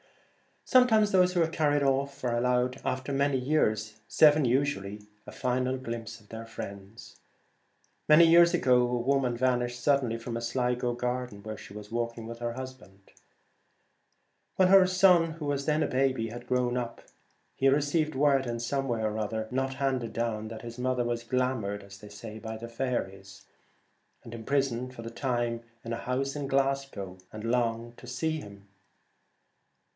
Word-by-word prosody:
Sometimes 220 Hz, -5 st, +4 dB
those 180 Hz, -1 st, +4 dB
who 175 Hz, -2 st, +3 dB
are -, -, +1 dB
carried 145 Hz, -3 st, +1 dB
off 140 Hz, +1 st, 0 dB
are 120 Hz, -2 st, 0 dB
allowed 125 Hz, +1 st, +1 dB
after 130 Hz, +2 st, -2 dB
many 140 Hz, 0 st, +1 dB
years 110 Hz, -6 st, 0 dB
— -, -, -39 dB
seven 150 Hz, -2 st, +7 dB
usually 120 Hz, -6 st, 0 dB
— 105 Hz, -, -38 dB
a -, -, -7 dB
final 130 Hz, +1 st, -1 dB
glimpse 115 Hz, -2 st, -6 dB
of 105 Hz, -, -23 dB
their 115 Hz, 0 st, -7 dB
friends. 100 Hz, -1 st, -9 dB, 0.9 s
Many 155 Hz, +2 st, +8 dB
years 170 Hz, +1 st, +6 dB
ago 125 Hz, -7 st, +4 dB
a 125 Hz, 0 st, 0 dB
woman 125 Hz, -1 st, +1 dB
vanished 120 Hz, -1 st, 0 dB
suddenly 135 Hz, -5 st, +2 dB
from 115 Hz, 0 st, -6 dB
a -, -, -4 dB
Sligo 125 Hz, 0 st, -1 dB
garden 125 Hz, -3 st, -3 dB
where 110 Hz, 0 st, -6 dB
she -, -, -12 dB
was 105 Hz, 0 st, -10 dB
walk 115 Hz, 0 st, -2 dB
ing 115 Hz, -, -7 dB
with 115 Hz, +1 st, -8 dB
her 120 Hz, 0 st, -3 dB
husband. 130 Hz, -7 st, -10 dB, 1.4 s
When 185 Hz, -1 st, +4 dB
her 190 Hz, -1 st, +7 dB
son, 180 Hz, -3 st, +5 dB
who 160 Hz, -2 st, -7 dB
was 140 Hz, -1 st, -1 dB
then 155 Hz, 0 st, +2 dB
a -, -, 0 dB
baby, 130 Hz, -3 st, 0 dB
had 120 Hz, +2 st, -9 dB
grown 125 Hz, -1 st, +1 dB
up 120 Hz, -1 st, -5 dB, 0.5 s
he 135 Hz, -, +2 dB
received 150 Hz, +2 st, +2 dB
word 135 Hz, -1 st, +3 dB
in 120 Hz, 0 st, -3 dB
some 135 Hz, +3 st, -2 dB
way, 115 Hz, -3 st, -1 dB, 0.5 s
not 135 Hz, +1 st, -1 dB
handed 130 Hz, -4 st, -1 dB
down, 115 Hz, -2 st, -2 dB
that 110 Hz, +1 st, -8 dB
his 120 Hz, +1 st, -8 dB
mother 125 Hz, 0 st, 0 dB
was 120 Hz, 0 st, -2 dB
glamoured 120 Hz, -5 st, -1 dB
by 105 Hz, +3 st, -9 dB
faeries, 110 Hz, -5 st, -4 dB, 0.8 s
and 115 Hz, -, -10 dB
imprisoned 125 Hz, +1 st, -1 dB
for 115 Hz, -, -8 dB
the 115 Hz, -, -7 dB
time 120 Hz, -2 st, -1 dB, 0.2 s
in 115 Hz, -, -4 dB
a -, -, -2 dB
house 135 Hz, +3 st, -2 dB
in 145 Hz, -2 st, -3 dB
Glasgow 135 Hz, -9 st, -1 dB
and 110 Hz, 0 st, -8 dB
longing 115 Hz, 0 st, 0 dB
to 125 Hz, -, -12 dB
see 155 Hz, +6 st, -2 dB
him. 100 Hz, -4 st, -12 dB
125 Hz, 165 wpm, -29 LUFS, 115-140 Hz, 1.4 s, Many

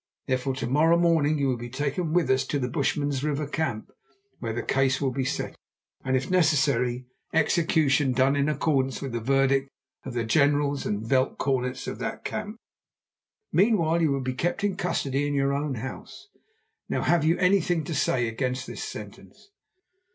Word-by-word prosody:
Therefore 130 Hz, +1 st, -1 dB
to -, -, -3 dB
morrow 155 Hz, +6 st, +4 dB
morning 160 Hz, -3 st, +3 dB
you 140 Hz, -1 st, +1 dB
will 130 Hz, -2 st, 0 dB
be 120 Hz, +1 st, -7 dB
taken 145 Hz, +5 st, -2 dB
with 170 Hz, -3 st, +2 dB
us 130 Hz, -, +3 dB
to 145 Hz, -, -1 dB
the 125 Hz, -3 st, -1 dB
Bushman's 145 Hz, 0 st, -1 dB
River 150 Hz, 0 st, -1 dB
camp, 140 Hz, -7 st, -3 dB, 0.5 s
where 115 Hz, -, -3 dB
the 120 Hz, -, -3 dB
case 135 Hz, 0 st, +1 dB
will 135 Hz, -2 st, 0 dB
be 130 Hz, +1 st, -2 dB
settled, 130 Hz, -, -3 dB, 0.4 s
and, 130 Hz, 0 st, +1 dB
if 130 Hz, -, -3 dB
necessary, 140 Hz, -8 st, +2 dB, 0.3 s
execution 155 Hz, -4 st, +2 dB
done 130 Hz, +2 st, +3 dB
in 140 Hz, +1 st, +1 dB
accordance 135 Hz, -4 st, 0 dB
with 135 Hz, -2 st, -5 dB
the 120 Hz, -, -2 dB
verdict 135 Hz, +2 st, +2 dB, 0.3 s
of 130 Hz, -2 st, -7 dB
the 120 Hz, -, 0 dB
generals 145 Hz, +3 st, +2 dB
and 105 Hz, +1 st, -2 dB
veld 130 Hz, +2 st, +1 dB
cornets 130 Hz, -2 st, -1 dB
of -, -, -5 dB
that -, -, -5 dB
camp. 210 Hz, +2 st, -4 dB, 0.9 s
Meanwhile 170 Hz, -5 st, +3 dB
you 160 Hz, -3 st, +3 dB
will 135 Hz, -1 st, 0 dB
be 130 Hz, 0 st, -2 dB
kept 175 Hz, +9 st, -2 dB
in 200 Hz, -2 st, +1 dB
custody 145 Hz, -5 st, -1 dB
in 145 Hz, -, -1 dB
your 140 Hz, 0 st, +1 dB
own 140 Hz, -1 st, -2 dB
house. 130 Hz, -, -8 dB, 0.6 s
Now -, -, -1 dB
have 170 Hz, -3 st, +3 dB
you 165 Hz, +2 st, +3 dB
anything 180 Hz, -3 st, +2 dB
to 160 Hz, -, -5 dB
say 130 Hz, -4 st, +1 dB
against 125 Hz, +2 st, -2 dB
this -, -, -6 dB
sentence?" 400 Hz, -, -10 dB
140 Hz, 180 wpm, -26 LUFS, 130-160 Hz, 0.9 s, morrow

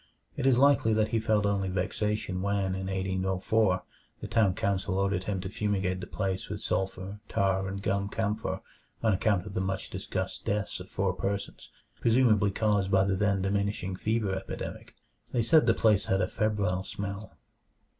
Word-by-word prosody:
It 130 Hz, -, 0 dB
is 130 Hz, -3 st, +5 dB
likely 135 Hz, -4 st, +5 dB
that 110 Hz, 0 st, +2 dB
he 115 Hz, -, +1 dB
felt 110 Hz, -2 st, +2 dB
only 100 Hz, -2 st, +1 dB
vexation 100 Hz, +1 st, -1 dB
when, 100 Hz, -1 st, 0 dB
in 95 Hz, 0 st, -3 dB
1804, 95 Hz, +1 st, +1 dB, 0.4 s
the -, -, -6 dB
town 110 Hz, -5 st, +3 dB
council 100 Hz, -1 st, 0 dB
ordered 100 Hz, -1 st, 0 dB
him 100 Hz, -2 st, -1 dB
to 95 Hz, -, -4 dB
fumigate 95 Hz, -2 st, -1 dB
the -, -, -6 dB
place 95 Hz, -2 st, -3 dB
with -, -, -4 dB
sulfur, 95 Hz, +1 st, -2 dB
tar, 95 Hz, 0 st, +1 dB
and 100 Hz, +1 st, -5 dB
gum 100 Hz, 0 st, 0 dB
camphor 110 Hz, 0 st, -2 dB, 0.4 s
on 110 Hz, -2 st, +4 dB
account 100 Hz, -1 st, +1 dB
of 105 Hz, -, -7 dB
the 95 Hz, -, -1 dB
much 95 Hz, 0 st, -3 dB
discussed -, -, -4 dB
deaths 105 Hz, 0 st, -2 dB
of 90 Hz, -, -10 dB
four 95 Hz, -1 st, 0 dB
persons, 100 Hz, +2 st, -4 dB, 0.3 s
presumably 115 Hz, -4 st, +4 dB
caused 100 Hz, -1 st, +1 dB
by 95 Hz, -1 st, +4 dB
the 95 Hz, 0 st, +1 dB
then 100 Hz, -1 st, +1 dB
diminishing 100 Hz, -1 st, -1 dB
fever 110 Hz, 0 st, 0 dB
epidemic. 95 Hz, 0 st, -6 dB, 0.4 s
They 120 Hz, -2 st, +2 dB
said 150 Hz, +2 st, +5 dB
the 115 Hz, -, +5 dB
place 105 Hz, -3 st, +3 dB
had 95 Hz, -, +2 dB
a -, -, +1 dB
febrile 100 Hz, -4 st, 0 dB
smell. 100 Hz, +1 st, -6 dB
100 Hz, 175 wpm, -29 LUFS, 95-105 Hz, 0.4 s, is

